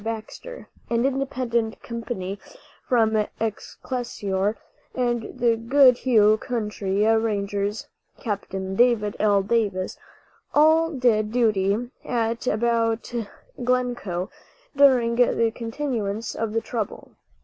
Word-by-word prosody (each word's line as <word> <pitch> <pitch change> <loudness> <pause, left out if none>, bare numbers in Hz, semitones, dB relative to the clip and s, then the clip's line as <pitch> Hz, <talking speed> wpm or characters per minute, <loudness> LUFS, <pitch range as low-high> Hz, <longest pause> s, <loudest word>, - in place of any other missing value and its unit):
Baxter), 225 - -7 0.2
an 235 +1 +1
independent 255 -4 -1
company 220 -5 -5 0.5
from 220 -3 +3
Excelsior, 215 -2 -3 0.4
and 240 -3 -1
the 235 -1 +3
Goodhue 235 -3 +4
County 210 -4 -1
Rangers 205 -2 0 0.3
(Capt. 205 -5 -4
David 205 +3 +1
L. 205 -2 +3
Davis), 200 -4 -1 0.6
all 315 +2 +5
did 235 -7 +1
duty 220 0 +1
at 230 0 -2
and - - +2
about 230 0 0 0.5
Glencoe 240 -7 -1 0.4
during 250 -4 +4
the 230 -2 +3
continuance 230 -3 -3
of 225 -1 -3
the 225 - +1
trouble. 225 -2 -5
225 Hz, 95 wpm, -24 LUFS, 210-245 Hz, 0.6 s, all